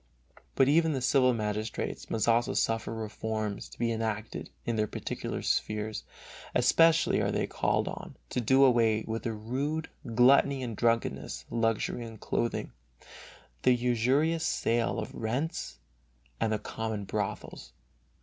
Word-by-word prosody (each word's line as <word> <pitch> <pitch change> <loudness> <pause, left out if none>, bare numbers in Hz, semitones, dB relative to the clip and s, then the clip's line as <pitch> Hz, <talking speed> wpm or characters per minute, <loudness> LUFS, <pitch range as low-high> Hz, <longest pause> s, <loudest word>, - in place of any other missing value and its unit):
But 135 - +4
even 160 +2 +4
the 135 - -1
civil 130 0 +4
magistrates 110 -1 -3
must 110 -2 0
also 120 +1 +3
suffer 115 0 0
reforms 110 -1 -4
to - - -14
be 115 -1 0
enacted 110 -1 -3 0.2
in 120 - -1
their 110 -1 +1
particular - - -4
spheres; 110 0 -1 0.5
especially 165 +6 +4
are - - +1
they - - 0
called - - 0
on - - -7
to 125 - 0
do 130 +4 +5
away 115 -4 +4
with 115 0 -3
the 115 - -2
rude 135 +9 -3 0.2
"gluttony 135 +2 +5
and 115 -3 -4
drunkenness," 75 - 0
luxury 115 +1 0
in 115 -1 -9
clothing, 115 +2 -2 0.9
the 125 -1 +5
usurious 130 +7 +2
sale 115 0 +1
of - - -4
rents 130 - -3 0.6
and 115 -1 +1
the 110 - +1
common 110 0 -4
brothels. 105 +1 -4
115 Hz, 140 wpm, -29 LUFS, 110-130 Hz, 0.9 s, do